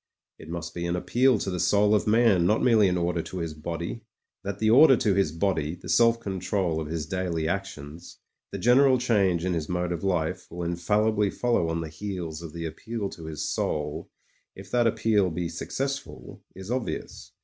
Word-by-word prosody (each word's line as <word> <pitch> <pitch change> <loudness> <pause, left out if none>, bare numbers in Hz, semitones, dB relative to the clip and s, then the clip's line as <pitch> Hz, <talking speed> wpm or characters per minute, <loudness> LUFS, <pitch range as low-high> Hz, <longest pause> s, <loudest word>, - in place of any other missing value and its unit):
It 80 - -12
must 85 0 -5
be 85 0 -3
an 85 - -1
appeal 125 +7 +2
to 95 - -3
the 90 - -3
soul 100 +4 +3
of 105 - +1
man, 105 -6 +4
not 110 - +2
merely 110 -5 +5
an 90 - 0
order 85 -1 0
to 95 - -8
his 85 -3 -3
body. 85 +7 -5 0.4
That 100 -1 -4
the 110 +1 +2
order 135 +1 +7
to 105 - +2
his 95 -5 +1
body, 80 -2 -1
the 90 - -11
self 115 0 +4
control 95 -5 -2
of 75 - -5
his 80 -1 -3
daily 90 -4 -2
actions, 85 -4 -6 0.3
the - - -4
gen 120 +2 +4
eral 135 -2 +5
change 100 -8 +1
in 95 - 0
his 80 -3 -3
mode 90 0 -1
of 85 - -4
life 90 -1 -1
will 85 0 -6
infallibly 105 +5 +1
follow 115 -7 0
on 80 0 -2
the 80 - -5
heels 85 -1 -5
of 85 -2 -8
the 85 +1 -6
appeal 105 +5 -4
to 80 - -10
his 80 -2 -4
soul 75 -1 -2 0.2
— - - -42
if 95 0 -12
that 120 -1 +3
appeal 105 -4 +2
be 85 +1 -3
successful 135 - -5
— - - -21
^is 95 +4 -7
obvious. 130 - -5
90 Hz, 205 wpm, -26 LUFS, 85-105 Hz, 0.4 s, order